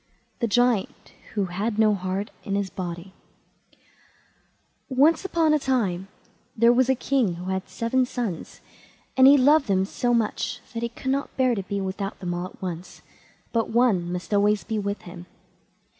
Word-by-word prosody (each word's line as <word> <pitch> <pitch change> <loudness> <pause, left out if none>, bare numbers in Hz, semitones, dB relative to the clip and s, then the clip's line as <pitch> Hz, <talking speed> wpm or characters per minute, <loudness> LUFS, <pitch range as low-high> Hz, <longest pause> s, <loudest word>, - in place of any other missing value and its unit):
THE 235 - +1
GIANT 240 -2 +1 0.2
WHO 200 -2 +1
HAD 205 +5 -3
NO 215 -1 +4
HEART 190 +2 -3
IN 200 - -2
HIS 200 -1 -2
BODY 175 0 -6 1.8
Once 305 +8 +3
on 320 -2 +4
a 305 - +3
time 200 -10 0 0.5
there 235 +2 +6
was 255 +1 +3
a 265 - +4
king 250 -8 0
who 180 +2 -5
had 190 0 -3
seven 250 +2 0
sons, 230 -10 -5 0.5
and 260 0 +7
he 285 +1 +8
loved 280 +1 +4
them 190 -1 +2
so 245 +4 -1
much 230 -3 0
that 230 - -3
he 235 - -1
could 260 +3 -4
never 275 +1 0
bear 255 -2 +3
to 205 - -2
be 200 +1 -4
without 195 +1 -4
them 180 -2 -3
all 175 +1 -3
at - - -17
once, 180 -1 -7 0.5
but 230 -1 +1
one 220 -7 +2
must 180 +3 -4
always 205 +1 +3
be 220 -2 -2
with 200 0 -3
him. 175 0 -10
210 Hz, 175 wpm, -25 LUFS, 190-250 Hz, 1.8 s, he